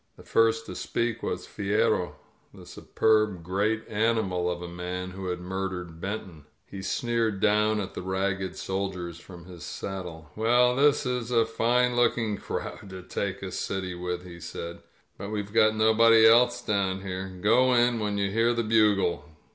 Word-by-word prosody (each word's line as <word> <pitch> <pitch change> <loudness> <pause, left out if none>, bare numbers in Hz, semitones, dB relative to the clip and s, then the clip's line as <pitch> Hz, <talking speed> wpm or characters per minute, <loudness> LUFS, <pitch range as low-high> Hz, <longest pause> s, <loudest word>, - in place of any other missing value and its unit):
The - - -14
first 115 0 +2
to - - -7
speak 115 -1 -2
was - - -3
Fierro, 105 -2 0 0.4
the - - -13
superb 110 -5 +1
great 105 +5 -1
animal 105 -5 0
of 90 0 -4
a - - -5
man 90 +1 -5
who 95 0 -6
had 90 0 -2
murdered 90 -2 -5
Benton. 95 -6 -6 0.2
He 100 - -8
sneered 115 0 -1
down 105 +1 +2
at 95 - -5
the - - -5
ragged 95 0 -2
soldiers 95 -3 -4
from 85 -1 -13
his 90 -2 -12
saddle. 85 -5 -7
^'Well, 120 +3 +3
this 145 +1 +3
is 125 -2 -2
a 115 -2 +3
fine 120 +2 +1
looking 115 -3 +1
crowd 100 -1 -6
to 95 -1 -9
take 95 +1 -4
a 95 - -5
city 95 0 -3
with,'' 90 0 -4
he 85 -1 -10
said, 85 +1 -7 0.4
^ut 100 +2 -6
we've 105 -1 -4
got 110 -1 +4
nobody 110 +1 +5
else 120 +2 +4
down 95 -2 0
here. 95 0 -4
Go 125 +6 +4
in 120 -1 +3
when 105 -1 -1
you 100 -1 0
hear 115 +3 +2
the 115 - 0
bugle." 105 -9 +2
100 Hz, 170 wpm, -27 LUFS, 90-115 Hz, 0.4 s, nobody